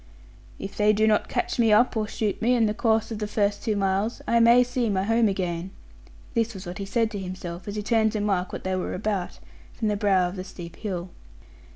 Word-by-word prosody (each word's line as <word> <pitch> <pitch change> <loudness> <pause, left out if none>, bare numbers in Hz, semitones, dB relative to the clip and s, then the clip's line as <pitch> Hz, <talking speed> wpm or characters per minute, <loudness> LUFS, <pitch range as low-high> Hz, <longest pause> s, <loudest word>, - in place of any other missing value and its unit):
'If 195 - -7
they 210 0 +4
do 215 +1 +2
not 215 -1 +2
catch 360 -6 -2
me 225 -2 +4
up, 240 +4 +4
or 215 -1 0
shoot 210 -2 -2
me, 245 +3 +3
in 230 -2 +3
the 210 - +1
course 225 0 +1
of 220 - -4
the 210 - -2
first 205 -1 0
two 215 - 0
miles, 195 +3 0
I 235 - +3
may 235 +2 +7
see 245 -1 -1
my 190 -2 +1
home 225 +2 +3
again'; 180 -2 -2 0.6
this 230 -2 0
was 190 0 -8
what 175 +2 -7
he 200 - -3
said 225 +1 +1
to 205 - -4
himself 185 -1 -7
as 205 - -4
he 210 - -3
turned 220 0 +2
to 215 - -1
mark 195 -3 0
what - - -6
they 185 0 -1
were 185 - -3
about, 190 -1 -2 0.4
from 220 -2 -1
the 210 - +1
brow 195 -3 +2
of 180 +2 -7
the 185 - -4
steep 175 -3 -10
hill. 185 -4 -4
210 Hz, 240 wpm, -25 LUFS, 190-225 Hz, 0.6 s, may